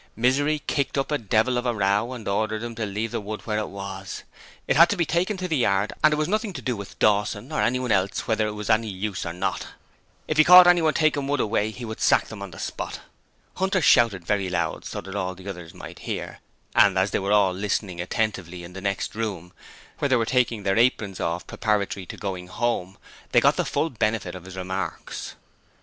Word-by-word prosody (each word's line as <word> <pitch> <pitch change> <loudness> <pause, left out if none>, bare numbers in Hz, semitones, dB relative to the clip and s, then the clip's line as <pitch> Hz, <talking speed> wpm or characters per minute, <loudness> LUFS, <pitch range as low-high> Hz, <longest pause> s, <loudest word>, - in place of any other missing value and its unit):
Misery 145 +6 +1
kicked 140 -1 -1
up 135 +2 -1
a 150 - +1
devil 115 +4 +1
of 125 - -3
a 120 - 0
row 100 +4 +1
and 115 -4 -8
ordered 110 +2 -1
him 120 0 -5
to 110 -1 -3
leave 105 +3 -3
the - - -2
wood 105 +1 -6
where 105 -1 -1
it 105 - -3
was: 95 -1 -7 0.4
it - - +1
had 170 +3 +7
to 205 - 0
be 170 - +2
taken 180 +6 0
to 185 0 -3
the 160 -4 0
yard, 100 -1 +1
and 155 - +7
it - - +2
was 155 0 0
nothing 215 0 -1
to - - -6
do 125 -3 -1
with 100 -2 -9
Dawson 105 +4 +1
or 155 - 0
anyone 125 -1 0
else 100 -1 +1
whether 110 -1 +1
it 105 - -4
was 105 0 -6
any 110 0 +3
use 100 -2 -4
or - - -3
not! 95 +2 -2 0.6
If 155 - -1
he 155 - +8
caught 180 +2 +10
anyone 170 -3 +4
taking 145 -3 +2
wood 145 0 0
away 105 -1 +1
he 120 +2 -7
would 110 0 -7
sack - - +3
them 110 -2 -9
on 100 - -6
the 85 - -12
spot. - - -5 0.6
Hunter 190 0 +1
shouted 115 - +4
very 100 -1 0
loud 90 -1 -2
so - - -5
that 95 +1 -9
all 95 -2 -2
the 95 +2 -12
others 90 -4 -7
might - - -10
hear, - - -5 0.3
and 100 -2 +5
as 95 +2 +2
they - - +1
were 100 +1 -2
all 100 -3 +4
listening 95 -2 -2
attentively 90 -3 -2
in 85 +1 -10
the 95 - -7
next 100 0 -2
room, 100 -6 -4 0.5
where 145 - 0
they 130 - +4
were 115 -2 +2
taking 120 -4 +1
their 95 +3 +2
aprons 110 -6 +1
off 85 +1 -2
preparatory 100 -3 -1
to - - -8
going 95 -3 -5
home, 100 -3 -2 0.4
they - - +7
got - - +4
the - - 0
full 165 - -1
benefit 110 -6 -1
of 90 -1 -9
his 95 0 -10
remarks. 95 +1 -5
105 Hz, 230 wpm, -24 LUFS, 95-125 Hz, 0.6 s, caught